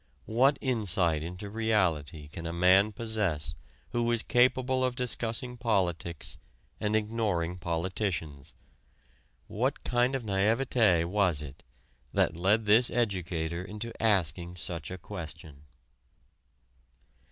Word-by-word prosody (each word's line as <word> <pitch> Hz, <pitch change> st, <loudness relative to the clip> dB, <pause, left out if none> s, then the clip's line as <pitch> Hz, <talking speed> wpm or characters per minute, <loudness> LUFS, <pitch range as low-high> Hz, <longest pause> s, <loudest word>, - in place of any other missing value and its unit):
What 130 Hz, +6 st, +3 dB
insight 95 Hz, -, +1 dB
into 90 Hz, +5 st, -6 dB
reality 85 Hz, -9 st, 0 dB
can 85 Hz, +2 st, -7 dB
a -, -, -3 dB
man 95 Hz, +4 st, +4 dB
possess 100 Hz, -9 st, -1 dB, 0.4 s
who 120 Hz, 0 st, +1 dB
is 115 Hz, -1 st, +1 dB
capable 130 Hz, +1 st, +2 dB
of 125 Hz, -1 st, 0 dB
discussing 125 Hz, 0 st, -2 dB
politics 90 Hz, -, -1 dB, 0.4 s
and 105 Hz, +1 st, 0 dB
ignoring 105 Hz, -6 st, -1 dB
politicians? 85 Hz, -4 st, -3 dB, 0.9 s
What -, -, -2 dB
kind 125 Hz, +2 st, +1 dB
of 130 Hz, -, -3 dB
naïveté 105 Hz, -2 st, +2 dB
was 90 Hz, -5 st, +1 dB
it 70 Hz, -1 st, -11 dB, 0.5 s
that 85 Hz, -, +2 dB
led 100 Hz, +6 st, +2 dB
this 110 Hz, +4 st, +5 dB
educator 90 Hz, -7 st, -1 dB
into 105 Hz, +4 st, -6 dB
asking 90 Hz, -5 st, +1 dB
such 85 Hz, -3 st, -5 dB
a 95 Hz, -, -6 dB
question? 80 Hz, -5 st, -9 dB
95 Hz, 110 wpm, -29 LUFS, 85-115 Hz, 0.9 s, this